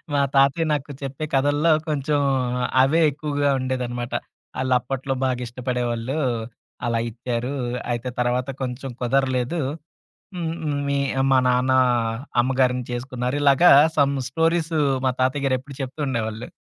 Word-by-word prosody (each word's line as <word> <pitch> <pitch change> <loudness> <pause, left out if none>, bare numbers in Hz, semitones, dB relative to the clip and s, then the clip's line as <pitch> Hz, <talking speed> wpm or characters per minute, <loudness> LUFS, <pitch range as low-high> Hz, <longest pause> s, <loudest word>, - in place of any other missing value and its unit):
మా 140 - +3
తాతయ్య 140 +4 +4
నాకు, 145 0 -3
చెప్పే 135 +3 -4
కథల్లో 145 +4 +3 0.2
కొంచెం, 145 0 0 0.6
అవే 155 +5 +3
ఎక్కువగా 145 0 -1
ఉండేదనమాట. 125 -2 -3 0.5
ఆళ్ళప్పట్లో 130 +1 0
బాగా 125 -1 -1
ఇష్టపడేవాళ్ళు, 125 +1 -2 0.7
అలా 115 -1 +1
ఇచ్చారు. 120 +2 -3 0.4
అయితే 120 +2 -3
తర్వాత 125 +2 0
కొంచెం 130 +1 -5
కుదరలేదు. 130 +4 0 0.8
హ్మ్. 165 -2 -2
హ్మ్. 145 -2 -1
మీ 140 0 +1 0.3
మా 130 - +6
నాన్నా, 125 +1 +3 0.6
అమ్మగారిని 125 -1 +1
చేసుకున్నారు. 125 +2 -3
ఇలాగా 145 +5 +6 0.3
సమ్ 140 -1 +3 0.2
స్టోరీసు, 165 +1 +1 0.3
మా 130 - +3
తాతయ్యగారేప్పుడు 130 0 -1
చెప్తుండేవాళ్ళు. 125 -5 -3
130 Hz, 110 wpm, -23 LUFS, 125-145 Hz, 0.8 s, మా